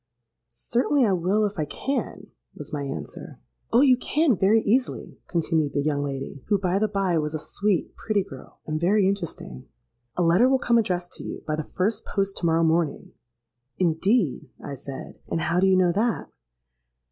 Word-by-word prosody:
'—Certainly 245 Hz, -, +1 dB
I 200 Hz, -, +2 dB
will, 190 Hz, +5 st, +1 dB
if 205 Hz, -3 st, -4 dB
I 155 Hz, -, +1 dB
can,' 270 Hz, -, -4 dB, 0.2 s
was -, -, -9 dB
my 145 Hz, -, -2 dB
answer.—'Oh! 135 Hz, -, -3 dB
you 265 Hz, -3 st, +6 dB
can 295 Hz, 0 st, +2 dB
very 205 Hz, +4 st, +4 dB
easily,' 250 Hz, +5 st, -1 dB
continued 160 Hz, -4 st, 0 dB
the 145 Hz, -, 0 dB
young 145 Hz, -1 st, 0 dB
lady, 135 Hz, -1 st, -5 dB
who, 205 Hz, -, +3 dB
by 185 Hz, 0 st, 0 dB
the 215 Hz, -, +2 dB
by, 195 Hz, -5 st, 0 dB
was 150 Hz, 0 st, -2 dB
a -, -, 0 dB
sweet 200 Hz, +3 st, -1 dB
pretty 210 Hz, -3 st, 0 dB
girl, 130 Hz, -6 st, -13 dB
and 155 Hz, 0 st, -3 dB
very 195 Hz, +2 st, +3 dB
interesting: 170 Hz, -, -4 dB, 0.5 s
'a 180 Hz, -, +2 dB
letter 175 Hz, +10 st, +5 dB
will 265 Hz, -, +4 dB
come 235 Hz, -2 st, +3 dB
addressed 180 Hz, -4 st, -2 dB
to -, -, -7 dB
you, -, -, -7 dB
by 155 Hz, -, -1 dB
the 155 Hz, -, -3 dB
first 195 Hz, +8 st, -2 dB
post 195 Hz, -1 st, -2 dB
to 170 Hz, -, 0 dB
morrow 165 Hz, 0 st, +3 dB
morning.'—'Indeed!' 150 Hz, -, -1 dB
I 140 Hz, -, -7 dB
said; 135 Hz, 0 st, -8 dB
'and 165 Hz, -, -2 dB
how 170 Hz, +2 st, +1 dB
do 190 Hz, -, +4 dB
you 190 Hz, -1 st, +4 dB
know 180 Hz, -2 st, +4 dB
that?' 220 Hz, +6 st, -1 dB
175 Hz, 180 wpm, -25 LUFS, 150-210 Hz, 0.5 s, you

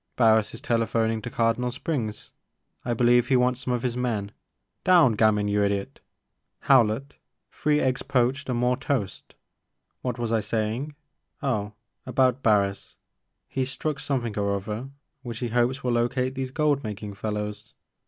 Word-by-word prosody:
Barris 110 Hz, -3 st, +3 dB
is -, -, -8 dB
telephoning 115 Hz, -1 st, 0 dB
to -, -, -5 dB
Cardinal 115 Hz, +2 st, +1 dB
Springs, 125 Hz, -5 st, -4 dB, 0.3 s
— -, -, -48 dB
I 120 Hz, -1 st, 0 dB
believe 120 Hz, +1 st, +4 dB
he 135 Hz, -, +3 dB
wants 125 Hz, 0 st, +2 dB
some 130 Hz, 0 st, -3 dB
of 120 Hz, -, -4 dB
his 125 Hz, -2 st, -1 dB
men, 110 Hz, -5 st, -2 dB, 0.3 s
— -, -, -53 dB
down! 170 Hz, -10 st, +6 dB
Gamin, 105 Hz, -1 st, +3 dB
you 105 Hz, 0 st, +2 dB
idiot! 100 Hz, -1 st, -2 dB, 0.6 s
Howlett, 130 Hz, +1 st, +3 dB, 0.4 s
three 150 Hz, 0 st, +1 dB
eggs 130 Hz, -2 st, 0 dB
poached 135 Hz, +1 st, 0 dB
and 125 Hz, -, 0 dB
more 125 Hz, +1 st, +2 dB
toast, 130 Hz, -8 st, -3 dB, 0.3 s
— -, -, -52 dB
^what 125 Hz, -2 st, -2 dB
was 120 Hz, -2 st, -2 dB
I 115 Hz, -, +3 dB
saying? 115 Hz, +7 st, -2 dB, 0.5 s
Oh, 105 Hz, -6 st, -1 dB, 0.3 s
about 130 Hz, 0 st, +2 dB
Barris; 100 Hz, -4 st, +1 dB, 0.5 s
he 135 Hz, -, -1 dB
's 130 Hz, -, -2 dB
struck 150 Hz, +2 st, -3 dB
something 120 Hz, -6 st, -2 dB
or 100 Hz, 0 st, +1 dB
other 105 Hz, +6 st, -5 dB, 0.3 s
which 120 Hz, -3 st, -6 dB
he 120 Hz, 0 st, -3 dB
hopes 125 Hz, +3 st, +1 dB
will 125 Hz, -, 0 dB
locate 120 Hz, +2 st, 0 dB
these 130 Hz, -1 st, -3 dB
gold 145 Hz, 0 st, +1 dB
making 105 Hz, -1 st, -5 dB
fellows. 105 Hz, 0 st, -5 dB
120 Hz, 165 wpm, -26 LUFS, 110-130 Hz, 0.6 s, down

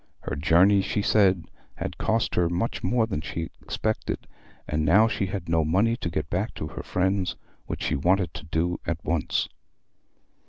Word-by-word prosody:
Her -, -, -4 dB
journey, 85 Hz, +7 st, +5 dB
she 105 Hz, +2 st, -1 dB
said, 95 Hz, -6 st, +3 dB, 0.3 s
had -, -, -5 dB
cost 115 Hz, 0 st, +1 dB
her 85 Hz, -1 st, +2 dB
much 90 Hz, +7 st, -2 dB
more 120 Hz, -2 st, +2 dB
than 95 Hz, -9 st, -3 dB
she 80 Hz, +1 st, -4 dB
expected, 110 Hz, 0 st, -2 dB, 0.4 s
and 75 Hz, +1 st, 0 dB
now 100 Hz, +9 st, +6 dB
she 100 Hz, -3 st, -1 dB
had 95 Hz, -1 st, -4 dB
no 80 Hz, -1 st, +2 dB
money 100 Hz, +9 st, +2 dB
to 105 Hz, -9 st, -3 dB
get 75 Hz, -1 st, -2 dB
back 95 Hz, +6 st, -2 dB
to -, -, -4 dB
her -, -, -6 dB
friends, 95 Hz, +1 st, 0 dB, 0.3 s
which -, -, -4 dB
she -, -, 0 dB
wanted 90 Hz, +6 st, +2 dB
to 85 Hz, -3 st, -8 dB
do 85 Hz, +3 st, -1 dB
at 85 Hz, -, 0 dB
once. 85 Hz, -3 st, 0 dB
90 Hz, 175 wpm, -26 LUFS, 80-100 Hz, 0.4 s, now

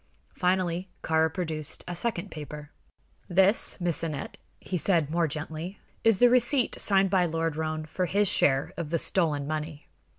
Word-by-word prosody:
Finally 180 Hz, 0 st, 0 dB
Kāra 160 Hz, 0 st, +2 dB
produced 160 Hz, -4 st, -2 dB
a 175 Hz, -, -4 dB
second 175 Hz, -1 st, -3 dB
paper. 150 Hz, -1 st, -8 dB, 0.6 s
"This, 190 Hz, +5 st, +3 dB
Miss 175 Hz, -2 st, 0 dB
Aneth," 150 Hz, -4 st, -4 dB, 0.2 s
he 185 Hz, -, -5 dB
said, 165 Hz, -4 st, +1 dB
more 170 Hz, 0 st, +1 dB
gently, 160 Hz, +5 st, -5 dB, 0.3 s
"is 225 Hz, -3 st, +4 dB
the 245 Hz, -, +6 dB
receipt 250 Hz, +1 st, +3 dB
signed 195 Hz, -2 st, +3 dB
by 185 Hz, -2 st, +3 dB
Lord 165 Hz, -1 st, -1 dB
Roane 155 Hz, 0 st, -3 dB
for 180 Hz, +4 st, -2 dB
his 205 Hz, +3 st, +2 dB
share 135 Hz, -5 st, +2 dB
of 170 Hz, -3 st, -4 dB
the 165 Hz, -, +1 dB
stolen 155 Hz, -5 st, +1 dB
money. 155 Hz, 0 st, -5 dB
170 Hz, 160 wpm, -27 LUFS, 155-185 Hz, 0.6 s, the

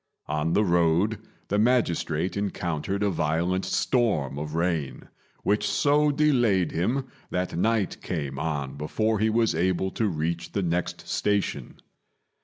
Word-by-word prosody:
On 75 Hz, +2 st, -1 dB
the 105 Hz, -, +4 dB
road 85 Hz, +4 st, +2 dB, 0.3 s
the 105 Hz, -, +1 dB
magistrate 95 Hz, -8 st, +1 dB
encountered 95 Hz, -1 st, -2 dB
a 100 Hz, -, +2 dB
violent 85 Hz, +3 st, 0 dB
storm 95 Hz, -, +1 dB
of 75 Hz, +1 st, -5 dB
rain, 85 Hz, -4 st, -2 dB, 0.3 s
which 105 Hz, +1 st, +1 dB
so 150 Hz, 0 st, +3 dB
delayed 120 Hz, -, +2 dB
him 120 Hz, +11 st, 0 dB, 0.2 s
that 90 Hz, -1 st, -2 dB
night 110 Hz, +2 st, 0 dB
came 70 Hz, -6 st, -4 dB
on 70 Hz, -3 st, -3 dB
before 110 Hz, +9 st, 0 dB
he 110 Hz, +1 st, +2 dB
was 115 Hz, 0 st, +2 dB
able 95 Hz, +3 st, 0 dB
to 110 Hz, -, 0 dB
reach 85 Hz, -1 st, -2 dB
the 100 Hz, -, 0 dB
next 85 Hz, 0 st, -2 dB
station. 100 Hz, -1 st, -1 dB
90 Hz, 135 wpm, -26 LUFS, 80-110 Hz, 0.3 s, the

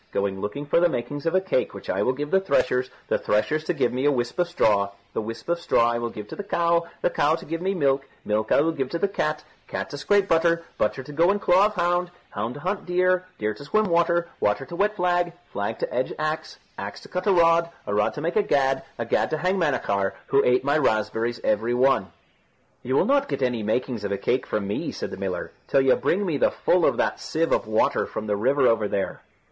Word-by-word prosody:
Going 100 Hz, -1 st, -1 dB
looking 105 Hz, +8 st, -4 dB
for 145 Hz, -, +3 dB
the 175 Hz, 0 st, +4 dB
makings 145 Hz, +3 st, -4 dB
of 165 Hz, -, +1 dB
a 185 Hz, -, +4 dB
cake 185 Hz, -9 st, -1 dB
which -, -, -10 dB
I -, -, 0 dB
will 130 Hz, -, +2 dB
give 145 Hz, +3 st, -5 dB
to 190 Hz, -, +5 dB
the -, -, -10 dB
threshers, 125 Hz, -6 st, +2 dB, 0.2 s
the -, -, +1 dB
threshers 150 Hz, +9 st, 0 dB
to 180 Hz, -, 0 dB
give 120 Hz, -, +1 dB
me 130 Hz, +2 st, -1 dB
a -, -, +5 dB
whisp 120 Hz, +3 st, -2 dB
of 175 Hz, -, +3 dB
straw, 105 Hz, -12 st, +2 dB, 0.2 s
the -, -, -1 dB
whisp 115 Hz, +1 st, -7 dB
of 170 Hz, 0 st, 0 dB
straw 120 Hz, -7 st, +3 dB
I 120 Hz, -, -1 dB
will 120 Hz, 0 st, -2 dB
give 105 Hz, -2 st, -8 dB
to -, -, -7 dB
the 205 Hz, -, -5 dB
cow, 170 Hz, -3 st, +1 dB, 0.2 s
the -, -, +2 dB
cow 155 Hz, +2 st, +2 dB
to 165 Hz, -, -10 dB
give 165 Hz, +2 st, -4 dB
me 190 Hz, +2 st, 0 dB
milk, 135 Hz, -4 st, +1 dB, 0.2 s
milk 110 Hz, +1 st, -1 dB
I -, -, +5 dB
will 165 Hz, +2 st, +2 dB
give 135 Hz, -5 st, -3 dB
to 170 Hz, -, -2 dB
the 200 Hz, -, +1 dB
cat, 155 Hz, -6 st, -2 dB, 0.2 s
cat -, -, -4 dB
to 145 Hz, -, -6 dB
scrape 200 Hz, +5 st, +2 dB
butter, 170 Hz, 0 st, +2 dB, 0.2 s
butter 120 Hz, +5 st, 0 dB
to 150 Hz, -, -10 dB
go 165 Hz, +4 st, +3 dB
in 205 Hz, -, +3 dB
claw 195 Hz, 0 st, +4 dB
of 210 Hz, -, -8 dB
hound, 175 Hz, 0 st, +1 dB, 0.2 s
hound 120 Hz, +2 st, -3 dB
to 145 Hz, -, -9 dB
hunt 190 Hz, +2 st, -3 dB
deer, 185 Hz, +1 st, +2 dB
deer 105 Hz, 0 st, -1 dB
to 105 Hz, -, -11 dB
swim 215 Hz, +9 st, +1 dB
water, 170 Hz, 0 st, +2 dB
water 105 Hz, +6 st, +1 dB
to 170 Hz, -, -8 dB
wet 205 Hz, +3 st, +1 dB
flag, 175 Hz, -2 st, +1 dB, 0.2 s
flag -, -, -2 dB
to -, -, -4 dB
edge -, -, -1 dB
axe, -, -, -3 dB, 0.2 s
axe -, -, -6 dB
to -, -, -13 dB
cut 180 Hz, +2 st, -4 dB
a -, -, +5 dB
rod, 170 Hz, -1 st, +4 dB, 0.2 s
a 100 Hz, -, -3 dB
rod 105 Hz, 0 st, +1 dB
to 150 Hz, -, -5 dB
make 170 Hz, +3 st, -2 dB
a 215 Hz, -, +5 dB
gad, 135 Hz, -8 st, +1 dB, 0.2 s
a 115 Hz, -, -3 dB
gad -, -, +1 dB
to 155 Hz, -, -1 dB
hang 185 Hz, +4 st, 0 dB
Manachar, 100 Hz, -, 0 dB, 0.2 s
who 140 Hz, -, +4 dB
ate 125 Hz, +1 st, +3 dB
my 145 Hz, +3 st, +2 dB
raspberries 115 Hz, -1 st, 0 dB
every 110 Hz, +3 st, +1 dB
one." 125 Hz, -8 st, +2 dB, 0.7 s
"You 130 Hz, +2 st, -2 dB
will -, -, +4 dB
not 280 Hz, 0 st, +2 dB
get -, -, -2 dB
any 125 Hz, -3 st, 0 dB
makings 115 Hz, +1 st, -1 dB
of 100 Hz, -, -3 dB
a 100 Hz, -, 0 dB
cake 125 Hz, +6 st, -1 dB
from 105 Hz, -2 st, -2 dB
me," 100 Hz, -, -2 dB
said -, -, -5 dB
the -, -, -6 dB
miller, -, -, -4 dB, 0.2 s
"till 135 Hz, -, +3 dB
you 135 Hz, -1 st, +4 dB
bring 200 Hz, +3 st, 0 dB
me 165 Hz, -6 st, 0 dB
the -, -, +4 dB
full 180 Hz, -2 st, +2 dB
of -, -, +1 dB
that -, -, 0 dB
sieve 165 Hz, +1 st, -1 dB
of -, -, +1 dB
water 110 Hz, 0 st, +1 dB
from 110 Hz, -, -5 dB
the 105 Hz, -1 st, 0 dB
river 130 Hz, +6 st, +2 dB
over 110 Hz, -2 st, +2 dB
there." 100 Hz, -1 st, -3 dB
145 Hz, 255 wpm, -24 LUFS, 120-175 Hz, 0.7 s, to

